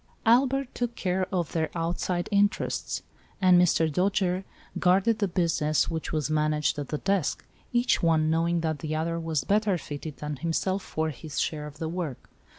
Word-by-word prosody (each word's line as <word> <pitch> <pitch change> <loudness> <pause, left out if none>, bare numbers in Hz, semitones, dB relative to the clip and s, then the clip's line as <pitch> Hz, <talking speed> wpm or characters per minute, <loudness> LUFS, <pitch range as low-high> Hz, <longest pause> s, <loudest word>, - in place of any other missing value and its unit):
Albert 260 +3 +3
took 240 -1 -2
care 185 0 -1
of 175 -4 -1
their 160 -2 0
outside 175 +1 -1
interests, 205 0 +1 0.4
and 185 -2 +6
Mr. 165 -2 +3
Dojere 185 +3 0 0.3
guarded 195 +5 +3
the 200 - +2
business 165 -4 +1
which 160 -1 -3
was 155 -3 0
managed 150 -1 +1
at 145 - -4
the 150 - -2
desk, 195 -1 0 0.3
each 240 +1 +2
one 160 -2 +3
knowing 165 +1 +1
that 160 -2 -1
the 155 +2 -3
other 165 +2 -1
was 160 -4 -1
better 205 +2 +2
fitted 150 -1 -7
than 150 -1 -4
himself 180 +5 -1
for 160 -3 -2
his 150 +2 -6
share 150 -1 -2
of 145 - -11
the 160 - -3
work. 165 -6 -5
170 Hz, 170 wpm, -27 LUFS, 155-190 Hz, 0.4 s, and